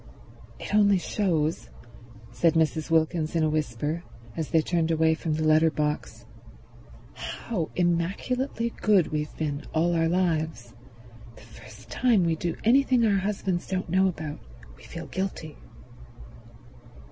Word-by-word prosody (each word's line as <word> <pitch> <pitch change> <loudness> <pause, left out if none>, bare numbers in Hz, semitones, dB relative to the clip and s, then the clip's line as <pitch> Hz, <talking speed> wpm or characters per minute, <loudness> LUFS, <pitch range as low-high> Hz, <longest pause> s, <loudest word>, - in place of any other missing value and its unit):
"It - - -6
only 205 -2 +5
shows," 170 -5 -1 0.6
said 165 +7 +2
Mrs. 160 0 +1
Wilkins 160 0 +1
in 165 - +2
a 155 - +2
whisper, 155 +2 -2 0.3
as 160 -2 -3
they 160 -2 +3
turned 165 -1 0
away 160 0 +3
from 160 -1 -2
the 155 - -1
letter 155 +1 +5
box, 150 -1 -3 0.9
"how 185 -9 -4
immaculately 200 +8 -1
good 200 -6 +4
we've 150 -1 -3
been 145 -2 -3
all 170 +2 +2
our 165 -1 +2
lives. 160 -9 -1 0.6
The - - -15
very - - -14
first - - -15
time 235 -7 +3
we 165 -1 +1
do 170 +1 -3
anything 250 0 +4
our 200 -3 +3
husbands 190 -2 -2
don't 185 -3 -3
know 190 +1 +4
about 155 -4 -5 0.4
we - - -20
feel - - -8
guilty." 185 -5 -4
165 Hz, 140 wpm, -26 LUFS, 155-190 Hz, 0.9 s, only